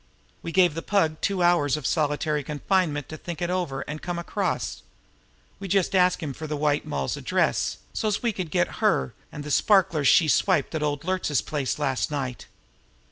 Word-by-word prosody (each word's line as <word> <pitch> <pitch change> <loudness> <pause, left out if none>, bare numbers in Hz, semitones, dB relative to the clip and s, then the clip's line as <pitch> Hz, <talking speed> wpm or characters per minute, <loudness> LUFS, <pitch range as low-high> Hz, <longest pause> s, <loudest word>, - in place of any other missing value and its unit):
We 165 - -5
gave 180 -2 +4
the 165 - -4
Pug 165 -6 +1
two 195 -3 0
hours 160 -5 +3
of 150 - -7
solitary 150 0 0
confinement 150 0 0
to 155 - -7
think 170 +1 -7
it 175 0 -1
over 175 -8 -2
and 155 +1 -6
come 175 -1 -3
across. 170 - -2 0.8
We 200 - -6
just 195 0 +1
asked 180 -2 +3
him 145 -3 -3
for 155 +3 -7
the 150 0 -3
White 145 0 0
Moll's 70 -2 -2
address, - - 0 0.2
so's 215 0 -1
we 235 -2 +1
could 185 -4 -4
get 175 +2 0
her 65 - +2 0.2
and 150 - -7
the 150 - -5
sparklers 180 -6 +3
she 160 - +6
swiped 185 +5 +2
at 160 - -2
Old 145 -1 -1
Luertz's 185 -6 0
place 145 -4 -2
last 135 -3 0
night." 135 -4 -4
155 Hz, 190 wpm, -25 LUFS, 145-180 Hz, 0.8 s, she